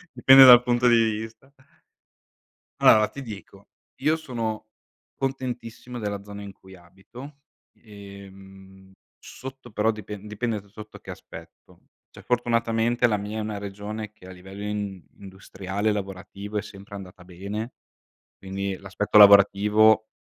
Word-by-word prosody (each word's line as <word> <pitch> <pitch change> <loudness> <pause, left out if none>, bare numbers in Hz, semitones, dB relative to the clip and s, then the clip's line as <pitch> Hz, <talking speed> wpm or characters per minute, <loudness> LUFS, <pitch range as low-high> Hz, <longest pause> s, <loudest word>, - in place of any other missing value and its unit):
Dipende 135 +2 +8
dal 125 -1 +9
punto 120 0 +1
di 120 - +5
vista. 110 +3 -2 1.3
Allora, 110 -1 +6
ti 140 - -10
dico, 100 -2 -12 0.3
io 155 +3 +2
sono 115 -8 -5 0.5
contentissimo 125 -2 -5
della 100 -2 -4
zona 100 0 -10
in 100 - -9
cui 95 0 -17
abito, 95 +11 -14 0.4
ehm, 95 -2 -15 0.3
sotto, 130 -2 -11
però, 105 +2 0
dipend 105 -1 -6
dipende 105 0 -3
da 100 - -23
sotto 105 +1 -12
che - - -16
aspetto. - - -13 0.3
Cioè, - - -14
fortunatamente, 120 0 0
la 105 -2 0
mia 105 +2 -6
è - - -2
una 105 -1 -5
regione 105 +1 -7
che, 95 -3 -17
a - - -10
livello, 95 +2 -11
in 100 -4 -5
industriale, 95 +1 -4
lavorativo, 100 +1 -6
è - - 0
sempre 100 -1 -13
andata 95 -2 -10
bene, 100 +6 -7 0.6
quindi, 95 0 -5
l'aspetto 100 +2 -1
lavorativo 105 +2 +6
105 Hz, 135 wpm, -24 LUFS, 100-115 Hz, 1.3 s, dal